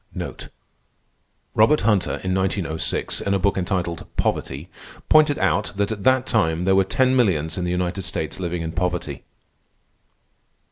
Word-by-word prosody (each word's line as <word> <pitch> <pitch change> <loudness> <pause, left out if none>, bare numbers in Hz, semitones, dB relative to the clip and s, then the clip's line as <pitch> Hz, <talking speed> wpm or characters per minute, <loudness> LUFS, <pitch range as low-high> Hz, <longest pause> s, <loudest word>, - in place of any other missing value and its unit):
Robert 110 +8 +4
Hunter, 105 -3 +2
in 95 0 -1
1906, 95 -4 -1
in 100 - 0
a - - +3
book 100 +1 +1
entitled 90 -2 -2
"Poverty," 70 +6 -2 0.4
pointed 155 -2 +5
out 95 +1 0
that 100 +1 0
at 105 -3 -5
that 130 0 +3
time 85 -5 +1
there 95 - +4
were 95 - +5
ten 130 +7 +2
millions 80 - +2
in 90 - -2
the - - -2
United 90 +1 -1
States 90 -3 -3
living 85 -2 -3
in 80 - -4
poverty. 90 0 -2
95 Hz, 145 wpm, -22 LUFS, 85-105 Hz, 0.4 s, pointed